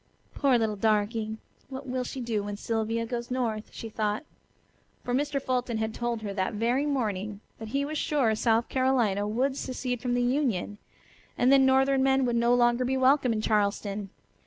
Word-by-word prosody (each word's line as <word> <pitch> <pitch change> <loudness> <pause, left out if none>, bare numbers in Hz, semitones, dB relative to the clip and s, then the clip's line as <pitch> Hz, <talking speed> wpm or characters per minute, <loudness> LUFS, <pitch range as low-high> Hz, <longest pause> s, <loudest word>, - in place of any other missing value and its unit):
"Poor 275 -4 +3
little 220 -2 0
darky! 215 +1 0 0.3
What 265 +1 -7
will 255 0 -2
she 255 +1 -6
do 230 -3 -1
when 205 0 -5
Sylvia 225 +1 -1
goes 235 0 -4
north?" 230 -4 -2
she 225 - -7
thought. 215 +4 -2 0.8
For 245 - -3
Mr. 285 +2 0
Fulton 250 -3 -1
had 220 0 -2
told 235 -2 -3
her 200 -2 -4
that 190 +2 -2
very 240 +7 +1
morning 210 -7 -2 0.2
that 220 - -7
he 275 +5 -1
was 305 +1 -3
sure 270 -7 +1
South 225 +1 +2
Carolina 240 -7 +1
would 260 +5 0
secede 250 -2 -3
from 245 -1 0
the 245 - +1
Union, 245 -6 0 0.6
and 250 +2 +4
then 270 -1 +6
northern 265 0 +3
men 265 0 +3
would 240 -1 0
no 235 +1 +3
longer 240 0 +3
be 260 +1 0
welcome 260 -1 +4
in 220 -1 -1
Charleston. 205 -1 0
240 Hz, 180 wpm, -28 LUFS, 215-260 Hz, 0.8 s, then